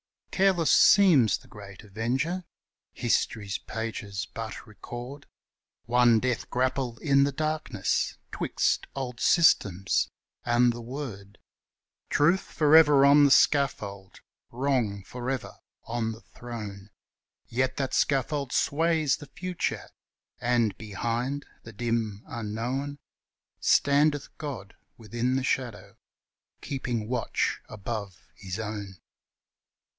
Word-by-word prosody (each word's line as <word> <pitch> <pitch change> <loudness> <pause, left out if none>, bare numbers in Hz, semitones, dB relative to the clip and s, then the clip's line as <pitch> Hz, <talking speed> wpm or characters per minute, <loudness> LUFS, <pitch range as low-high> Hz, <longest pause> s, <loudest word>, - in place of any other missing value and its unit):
Careless 185 -5 +3
seems 155 - +6
the - - -20
great 100 0 -12
Avenger; 125 - -2 0.5
history's 110 -4 -1
pages 100 -4 -5
but 115 -1 -6
record 120 +6 -9 0.6
One 120 -1 +4
death 125 0 -2
grapple 125 -1 -1
in 140 +1 +3
the 140 - 0
darkness 155 -8 -1
'twixt - - 0
old 125 -3 -5
systems 100 - +3 0.3
and 120 0 +3
the 120 - -7
Word; 115 -6 -7 0.7
Truth 170 +6 +3
forever 150 -3 +5
on 145 +1 +7
the - - +5
scaffold, 110 -10 +1 0.3
Wrong 120 -6 -1
forever 125 +5 -5 0.3
on 115 -1 -2
the 110 - -13
throne, 105 -5 -9 0.6
Yet 130 +2 -1
that 135 -2 -2
scaffold 140 0 0
sways 160 -2 +1
the 145 - -11
Future, 180 +3 -4 0.5
and, 120 -4 +1
behind 120 +6 -3 0.2
the 115 - -12
dim 115 -2 -2
unknown, 120 +5 -4 0.6
Standeth 145 0 +2
God 125 -10 -6 0.2
within 120 +3 -2
the 135 - 0
shadow, 125 -5 -3 0.6
keeping 120 -5 -3
watch 125 -1 -1
above 100 -2 -6
his 95 +2 -6
own. 105 -3 -5
120 Hz, 105 wpm, -27 LUFS, 110-140 Hz, 0.7 s, on